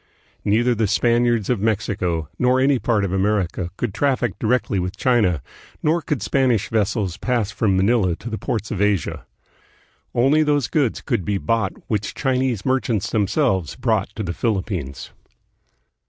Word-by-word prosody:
Neither 120 +4 +2
the 110 -2 0
Spaniards 120 0 +2
of 125 -4 +1
Mexico 95 -6 -1
nor 125 +1 +3
any 135 0 +3
part 105 -2 +1
of 95 - -3
America 95 -3 0
could 120 -5 -2
traffic 125 -2 +1
directly 110 -3 +1
with 90 +2 -3
China, 105 - +2 0.4
nor 165 +3 +2
could 150 -3 -2
Spanish 125 -7 +1
vessels 105 -4 0
pass 120 -5 -1
from 100 -3 +1
Manila 95 -3 +2
to 115 - -10
the 110 -2 -4
ports 110 -2 -3
of 105 -4 -2
Asia. 105 -5 0 0.9
Only 135 +6 +4
those 145 -3 +2
goods 140 -8 0
could 95 - -1
be 100 +3 -1
bought 110 -1 0
which 105 -2 -2
Chinese 130 -6 0
merchants 130 -6 0
themselves 100 - +1
brought - - 0
to 110 - -3
the 85 -3 -3
Philippines. 95 - -3
110 Hz, 155 wpm, -21 LUFS, 95-125 Hz, 0.9 s, Only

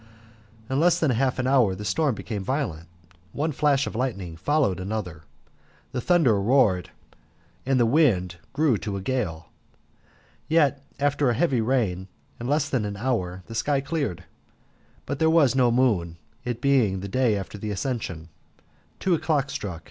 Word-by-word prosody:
In 130 +2 0
less 175 +1 +4
than 155 -5 +2
half 130 +2 +1
an 130 - -1
hour 125 -8 +3
the 105 +2 -7
storm 125 +7 +1
became 105 -2 -5
violent, 95 - -3 0.5
one 155 +3 -1
flash 140 -1 +2
of - - -6
lightning 100 -9 -3
followed 130 - +1
another, 90 -5 -5 0.7
the 125 - -3
thunder 130 - +3
roared, 100 -6 +3 0.8
and 135 -1 +3
the 120 - +4
wind 115 - +2
grew 140 -7 +2
to 100 -2 -4
a - - -5
gale. 95 -9 -3 1.0
Yet 145 -4 +2 0.2
after 140 -1 +2
a 120 - +1
heavy 130 -4 +2
rain, 110 -7 0 0.3
in 120 - -4
less 145 +2 +1
than 125 -5 -1
an 100 -1 -4
hour, 95 -6 -2
the 115 - -10
sky 140 +5 +1
cleared, 135 - -3 0.8
but 140 +1 -4
there 160 - +4
was 160 -6 +4
no 125 -2 +4
moon, 105 -10 +1 0.3
it 120 -1 -3
being 120 -9 +2
the 100 - -5
day 115 0 +1
after 100 +1 -7
the 105 - -4
Ascension. 100 - -4 0.7
Two 185 - +1
o'clock 155 -4 0
stuck. 90 -10 -5
125 Hz, 165 wpm, -25 LUFS, 100-140 Hz, 1.0 s, less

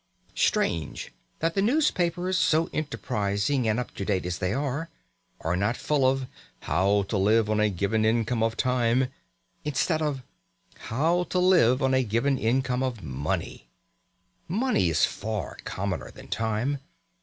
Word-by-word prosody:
Strange 80 -3 0 0.3
that 165 +1 +1
the 195 - +1
newspapers, 185 - +1
so 165 -2 +2
enterprising 115 -2 -1
and 110 +2 +1
up 125 - -5
to - - -5
date 95 -3 0
as 90 0 -3
they 90 0 0
are, 145 +5 -2 0.5
are 80 +2 0
not 105 +6 0
full 140 -4 +2
of 135 0 -1 0.4
"How 100 +2 +2
to 100 +1 -2
live 110 +2 +3
on 110 - +1
a 105 0 +3
given 100 +4 0
income 115 +1 +1
of 115 0 0
time," 125 0 +2 0.5
instead 155 +3 0
of 145 -4 -1 0.7
"How 165 +9 +1
to 180 - -3
live 170 -8 +4
on 130 0 +2
a 130 - +4
given 120 +5 +1
income 125 +2 +1
of 125 -6 -2
money"! 65 -3 -3 0.8
Money 205 - +1
is 80 -1 +3
far 105 -6 -4
commoner 95 -2 -3
than - - -13
time. 110 +7 -1
120 Hz, 150 wpm, -26 LUFS, 105-145 Hz, 0.8 s, live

